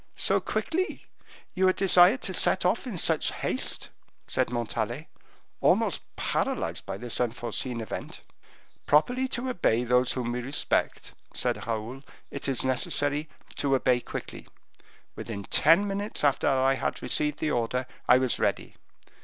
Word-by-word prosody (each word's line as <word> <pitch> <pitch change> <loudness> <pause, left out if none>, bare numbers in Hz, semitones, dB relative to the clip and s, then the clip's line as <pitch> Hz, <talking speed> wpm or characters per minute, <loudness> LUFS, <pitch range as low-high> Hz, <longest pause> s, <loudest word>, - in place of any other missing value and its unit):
"So - - +3
quickly! 370 +4 -2 0.5
You 190 0 +2
are 185 - +4
desired 190 +6 +5
to 190 - -3
set 185 - +1
off 220 +8 +1
in 215 -7 -5
such 160 -1 +2
haste!" - - -2 0.4
said - - 0
Montalais, 120 +3 -3 0.5
almost - - +2
paralyzed - - -2
by 95 - -4
this 120 +3 -2
unforeseen 120 0 -2
event. 110 - -7 0.7
"Properly 245 - +3
to 255 0 -3
obey 145 - +1
those 125 +1 +2
whom 120 -2 -3
we 125 +1 -3
respect," 135 +4 -1 0.2
said - - -2
Raoul, 115 +4 -4 0.3
"it 140 - -4
is 130 -1 0
necessary 145 +3 0 0.3
to 140 -1 +1
obey 125 -1 +2
quickly. - - -8 0.7
Within 100 -3 -6
ten 165 - +4
minutes 200 -1 -2
after 145 -2 +2
I 135 0 +3
had 135 - -3
received 150 -1 +2
the 155 0 -1
order, 125 +1 -1 0.2
I - - +8
was 130 -1 0
ready. - - -1
135 Hz, 145 wpm, -27 LUFS, 120-180 Hz, 0.7 s, I